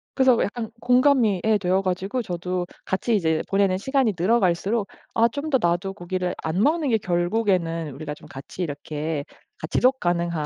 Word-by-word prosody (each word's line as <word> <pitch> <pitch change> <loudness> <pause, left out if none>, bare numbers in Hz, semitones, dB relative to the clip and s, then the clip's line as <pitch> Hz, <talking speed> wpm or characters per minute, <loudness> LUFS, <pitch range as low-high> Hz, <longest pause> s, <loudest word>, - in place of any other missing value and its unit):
그래서 260 -3 +5
약간 225 +1 -4
공감이 250 -6 +3
예 220 -1 +3
되어 190 0 +1
가지고 195 +6 -2
저도 180 -2 -3 0.2
같이 215 +4 0
이제 160 -5 +1
보내는 195 -1 +2
시간이 265 -1 +1
늘어갈수록 200 +1 +2 0.3
'아 230 +1 +5
좀 285 +5 -5
더 - - +7
나도 175 +3 0
고기를 180 -1 -3
안 160 +4 0
먹는 305 0 +2
게 225 - +3
결국에는 175 -4 0
우리가 150 +1 -5
좀 - - -15
같이 135 +6 -9
이렇게 150 0 -4 0.4
가 155 - -5
지속 260 - +2
가능한 170 -3 0
185 Hz, 355 characters per minute, -24 LUFS, 170-230 Hz, 0.4 s, 더